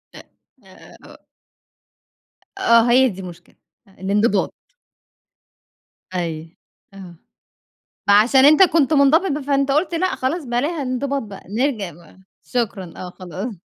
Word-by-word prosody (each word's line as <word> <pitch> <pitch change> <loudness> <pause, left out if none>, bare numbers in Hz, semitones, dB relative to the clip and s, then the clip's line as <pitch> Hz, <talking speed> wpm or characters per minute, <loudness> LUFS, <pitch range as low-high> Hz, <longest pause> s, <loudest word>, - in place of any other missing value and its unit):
أ - - -10 0.4
أ - - -21
أ - - -17
أ - - -17 1.3
أ - - -8
آه، 235 -5 +4
هي 260 +1 +5
دي 190 -1 -8
المشكلة، 175 -1 -12 0.3
أ - - -22
الإنضباط. 205 +1 0 1.6
أيوه، 165 -2 -4 0.4
آه، 185 -3 -12 0.9
ما 200 - +5
عشان 260 +5 +4
أنت 310 +6 +7
كنت 320 -4 +2
مُنضبِط 300 +6 +3
ب 295 +1 -3
فأنت 275 0 0
قُلت، 310 +4 0
لأ، 370 +2 -1
خلاص 295 +4 -3
بلاها 280 +6 -2
الإنضباط 270 +2 -2
بقى، 205 -2 -11
نرجَع 220 -5 -2
بقى، 170 +3 -19 0.3
شكرًا، 200 -8 -3
آه، 180 - -7
خلاص. 190 +5 -7
240 Hz, 135 wpm, -20 LUFS, 190-280 Hz, 1.6 s, أنت